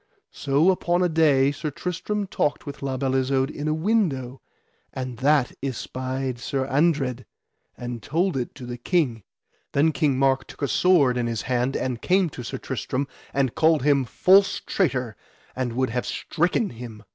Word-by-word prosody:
So 145 +6 +2
upon 175 -1 +1
a 180 - +2
day 145 -4 +4
Sir 150 +2 -4
Tristram 180 +7 -3
talked 150 -5 -1
with 145 0 -8
La 135 -1 -2
Beale 130 0 -1
Isoud 130 +1 +1
in 150 +1 -5
a 155 - +2
window, 155 - 0 0.5
and 130 -2 -5
that 140 0 +3
espied 130 -1 -3
Sir 130 +2 -2
Andred, 135 -3 +1 0.5
and 120 -1 -5
told 175 +3 0
it 125 -2 -3
to 130 - -9
the 120 0 -6
King. 130 -6 0 0.5
Then 150 +3 +3
King 145 -3 +1
Mark 135 0 +2
took - - -9
a - - +2
sword 145 -7 +3
in 120 -1 0
his 115 -2 -3
hand 125 +1 0
and 125 -2 -3
came 185 -3 +2
to 125 - -7
Sir 115 - -5
Tristram, 130 +2 -3 0.2
and 135 -3 0
called 160 -3 +3
him 140 -2 +3
false 190 +10 +4
traitor, 130 - -1 0.4
and 125 -2 -2
would 130 0 0
have 125 0 -2
stricken 180 +6 0
him. 115 -3 -9
135 Hz, 170 wpm, -24 LUFS, 125-160 Hz, 0.5 s, day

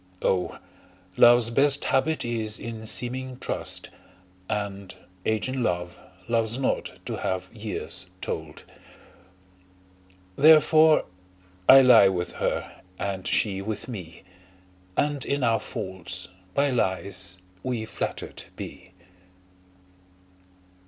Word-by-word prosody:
O! 90 -1 0 0.6
love's 120 -1 +6
best 140 +3 +3
habit 145 +3 +1
is 110 -2 -2
in 115 -1 -7
seeming 130 +2 -1
trust, - - -4 0.6
And 100 -2 -4 0.3
age 110 +1 +1
in 130 0 -2
love, 90 -4 -1 0.3
loves 115 0 0
not 135 - -1
to - - -3
have 95 +1 -3
years 110 -1 -3
told: - - -5 1.7
Therefore 155 +2 +6 0.6
I 135 - +11
lie 125 -6 +8
with 90 -2 -1
her, - - -3 0.2
and 95 -2 -3
she 95 -3 +2
with 105 +1 -4
me, 90 -9 -8 0.7
And 145 -2 +1
in 140 -1 -1
our 115 -2 +3
faults 95 -1 -6 0.3
by 140 0 +2
lies 95 -5 -1 0.2
we 120 -4 -3
flatter'd - - -5
be. 95 - -9
110 Hz, 105 wpm, -26 LUFS, 95-130 Hz, 1.7 s, I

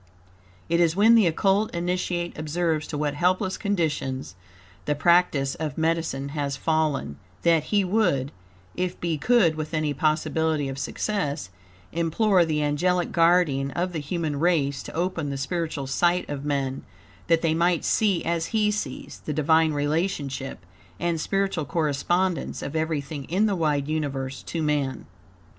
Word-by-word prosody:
It 170 +1 +1
is 170 -1 +3
when 215 +4 +6
the 220 -5 +6
Occult 195 +5 +1
Initiate 175 0 -2
observes 155 0 -1
to 150 - -4
what 145 -1 -1
helpless 185 +4 +1
conditions 155 - -2 0.5
the 150 - 0
practice 145 -3 +3
of 150 -3 -4
medicine 160 -4 -1
has 140 -1 -3
fallen, 155 - 0 0.2
that, 165 -2 +3
he 205 -2 +2
would, 180 -9 +1 0.4
if 180 0 -3
be 165 -3 -1
could 200 -2 +4
with 155 +1 -4
any 155 -1 0
possibility 155 0 0
of 135 0 -5
success, 150 - -2 0.4
implore 175 +4 +2
the 150 -2 0
angelic 175 +5 +1
guardian 165 -5 +3
of 180 +5 -2
the 160 - -2
human 150 -1 -2
race 150 -5 +1
to - - -9
open 165 -3 -1
the 140 - -3
spiritual 155 0 -3
sight 175 +6 +1
of 145 -1 -5
men, 135 -2 -1 0.5
that 165 0 +3
they 160 -1 +2
might 170 +1 +1
see, 200 -5 +2
as 170 -1 0
he 215 -2 +1
sees, 180 -11 -5
the 150 - -2
Divine 160 +2 +3
relationship, 145 - -2 0.3
and 170 -2 -1
spiritual 195 -5 -1
correspondence, 170 +4 0
of 140 - -5
everything 155 -3 -2
in 190 +6 +1
the 205 -2 +1
wide 150 -4 0
universe 135 -4 -3
to 165 -2 -4
man. 145 - -1
160 Hz, 150 wpm, -25 LUFS, 145-175 Hz, 0.5 s, when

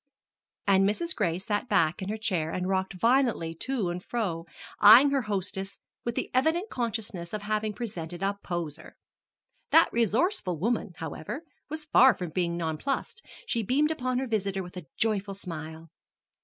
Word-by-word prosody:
And 195 0 +4
Mrs. 335 +11 -2
Gray 175 -6 0
sat 205 +5 -2
back 170 -3 +2
in 190 - -4
her 215 - -2
chair 185 -8 -1
and 180 +2 -2
rocked 190 0 0
violently 235 -9 +2
to 225 +1 -2
and 180 +1 -5
fro, 175 -8 -3 0.4
eying 235 +7 +9
her 275 -1 +2
hostess 195 -2 -3 0.3
with 235 0 -2
the - - -3
evident 320 - +1
consciousness 215 -7 -3
of 210 -1 -3
having 215 0 -1
presented 180 -5 -5
a 200 +1 +1
poser. 165 -3 -5 0.7
That 325 - +5
resourceful 230 - +1
woman, 215 +1 -1
however, 175 - -6 0.3
was 310 0 -4
far 265 -5 +6
from 180 -3 -5
being 170 0 -1
nonplussed; 170 - -2 0.2
she 235 - 0
beamed 285 +8 +2
upon 255 -5 -1
her 265 - 0
visitor 200 -5 -1
with 180 0 -11
a 180 -5 -8
joyful 205 -3 0
smile. 160 -3 -7
200 Hz, 160 wpm, -28 LUFS, 175-240 Hz, 0.7 s, eying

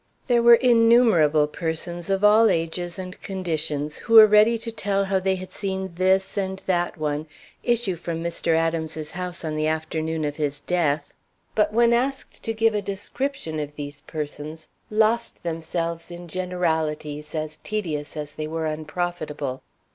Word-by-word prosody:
There 240 -2 +3
were 235 0 +9
innumerable 230 - +5
persons 170 +3 -4
of 195 +1 0
all 215 +2 +6
ages 170 +2 -2
and 185 0 -8
conditions 155 -6 -2
who 230 - 0
were 220 -1 +12
ready 215 +2 +5
to 230 +1 -6
tell 200 -3 0
how 190 0 +1
they 190 0 +1
had 185 0 -8
seen 190 -2 -3
this 190 +3 +1
and 190 0 -3
that 175 -2 0
one 150 0 -2 0.3
issue 235 -6 +1
from 165 0 -4
Mr. 170 -1 0
Adams's 160 -1 -1
house 180 -2 -4
on 155 -1 -2
the 155 0 0
afternoon 160 0 -2
of 145 0 -3
his 145 -2 -2
death, 155 -5 0 0.4
but 210 -1 +2
when 235 +1 +4
asked 265 +3 -1
to 225 - -2
give 225 0 +2
a 210 - 0
description 200 - -3
of 150 0 -5
these 145 -1 -7
persons, 155 +1 -6 0.2
lost 220 +2 +1
themselves 165 0 -3
in 175 0 -9
generalities 160 -4 -2
as 155 0 -3
tedious 160 -9 -3
as 150 0 -4
they 155 - -4
were 160 +1 -3
unprofitable. 155 -3 -3
170 Hz, 160 wpm, -24 LUFS, 155-200 Hz, 0.4 s, were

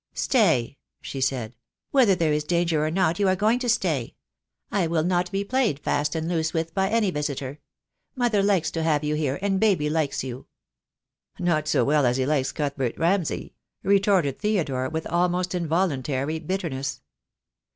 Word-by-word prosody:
"Stay," 160 - +2 0.2
she 135 - -6
said. 125 -4 -1 0.4
"Whether 245 -9 +5
there 165 -4 +1
is 150 0 0
danger 170 -1 +1
or 155 - 0
not 170 0 +1
you 200 - +3
are 185 - +3
going 215 +5 +2
to 250 -1 -2
stay. 165 - 0 0.6
I 190 -5 +1
will 160 -1 +1
not 180 +1 0
be 195 +1 -1
played 240 - +1
fast 150 +2 -1
and 160 0 -2
loose 165 -1 -1
with 165 0 -2
by 190 +1 +1
any 215 -3 +2
visitor. 145 -2 -4 0.6
Mother 240 -5 +2
likes 195 -5 +2
to 165 - -2
have 155 -2 +1
you 150 0 0
here, 150 -3 -1
and 195 -1 +1
baby 185 -9 +2
likes 150 -5 -1
you." 130 0 -7 0.9
"Not 170 -4 0
so - - +2
well 150 0 +3
as 120 +1 +1
he 130 - +1
likes 140 -2 0
Cuthbert 140 -4 -2
Ramsay," 175 0 0 0.3
retorted 195 -8 +2
Theodore, 150 -12 0
with 160 0 -4
almost 180 +1 0
involuntary 155 -4 -1
bitterness. 155 -6 -3
165 Hz, 170 wpm, -25 LUFS, 145-190 Hz, 0.9 s, Whether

